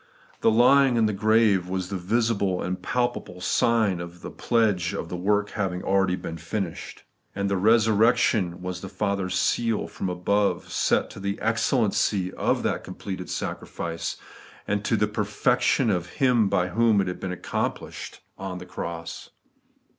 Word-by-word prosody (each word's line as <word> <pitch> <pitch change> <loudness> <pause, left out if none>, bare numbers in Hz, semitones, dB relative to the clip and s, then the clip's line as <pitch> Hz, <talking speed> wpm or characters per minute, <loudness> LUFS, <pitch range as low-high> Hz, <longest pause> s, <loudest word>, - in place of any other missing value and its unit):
The - - +4
lying 125 +3 +5
in 115 - +4
the 105 - +1
grave 105 -3 +3
was 95 -1 -3
the 100 - -3
visible 100 -1 0
and 90 0 -3
palpable 120 -7 -2
sign 105 -2 +2
or 85 - -5
pledge 90 +1 0
of 85 - -5
the 90 - -4
work 105 +3 +1
having 95 -4 -2
been - - -9
already 95 -1 +2 0.2
finished; 85 +2 -5 0.3
and 100 0 -1
resurrection 105 -2 +3
was 90 0 -4
the 95 - -7
Father's 95 -1 -1
seal 115 +4 +1
from 95 - -4
above 100 +3 0
set - - +1
to - - -10
the 100 +1 -3
excellency 110 -4 +1
of - - 0
that - - -1
completed 95 -2 -6
sacrifice, 85 -1 -4 0.5
a.nd 105 0 0
to 115 - +2
the 105 - +2
perfection 105 +3 +1
of 90 -2 -1
Him 120 -6 +3
by 90 -1 +1
whom 110 +1 +3
it 95 - +1
had 90 - -4
been 90 -1 -4
fl,ccomplished - - -4 0.2
on 95 -1 -5
the 90 - -8
cross. 85 -2 -6
100 Hz, 155 wpm, -25 LUFS, 90-110 Hz, 0.5 s, lying